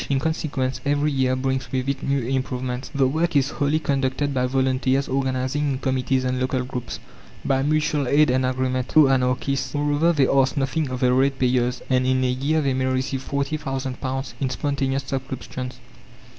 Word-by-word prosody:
In 140 - +2
consequence 140 -4 -2
every 145 +1 +1
year 130 -2 +1
brings 130 -1 -2
with 130 0 -1
it 140 -1 -1
new 140 -1 0
improvements. 130 0 -3
The 135 -1 +2
work 160 +4 0
is 140 0 +3
wholly 145 +2 +1
conducted 140 -1 -1
by 125 -1 +1
volunteers 130 +1 +1
organizing 130 +2 -1
in - - -2
committees 130 0 0
and 130 0 -1
local 130 0 0
groups; 125 -1 -5 0.5
by 135 -1 +2
mutual 150 -1 +1
aid 145 +1 +4
and 130 +1 +2
agreement! 130 0 -1
Oh, 155 -3 +8
Anarchists! 130 +1 0
Moreover, 145 +3 +2
they 140 -5 +3
ask 135 +1 +2
nothing 140 +2 0
of 125 -1 -4
the 125 -1 +4
ratepayers, 130 -2 +1
and 130 -1 +2
in 130 0 +2
a 125 - +2
year 140 +5 0
they 135 -1 +1
may 130 0 0
receive 130 0 -2
£40,000 135 -2 -3
in 135 - 0
spontaneous 135 0 -1
subscriptions. 130 -1 -5
135 Hz, 170 wpm, -23 LUFS, 130-140 Hz, 0.5 s, Oh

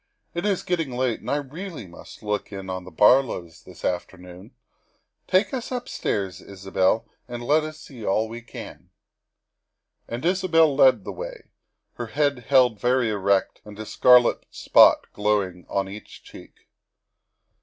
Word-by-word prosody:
It 175 +4 -2
is 195 -3 0
getting 165 -5 -1
late 125 -2 -1
and - - -8
I - - +1
really 155 - -6
must 85 -1 -14
look 105 0 -3
in 95 -1 -6
at 95 0 -5
the - - -9
Bar 105 +10 +6
lows 85 -10 -8
this - - -11
afternoon. 90 0 -5 0.7
Take 190 +6 +2
us 255 -1 -4
upstairs, 100 - -3
Isabel, 95 +2 -1 0.2
and 120 -1 -6
let 150 +5 +3
us 155 0 -7
see 125 -6 -11
all 110 +3 +1
we 115 +1 -8
can." 120 - -11 1.2
And 120 +6 -5
Isabel 170 -5 +3
led 130 -6 +5
the - - -6
way, - - -9 0.5
her 120 - -4
head 140 0 -1
held 125 -6 +4
very 125 0 +1
erect 100 -1 0
and 105 -1 -12
a 110 - -6
scarlet 125 +3 +4
spot - - +5
glowing 100 -4 -1
on 100 -1 -1
each 100 +2 -11
cheek. - - -15
120 Hz, 155 wpm, -24 LUFS, 100-145 Hz, 1.2 s, Bar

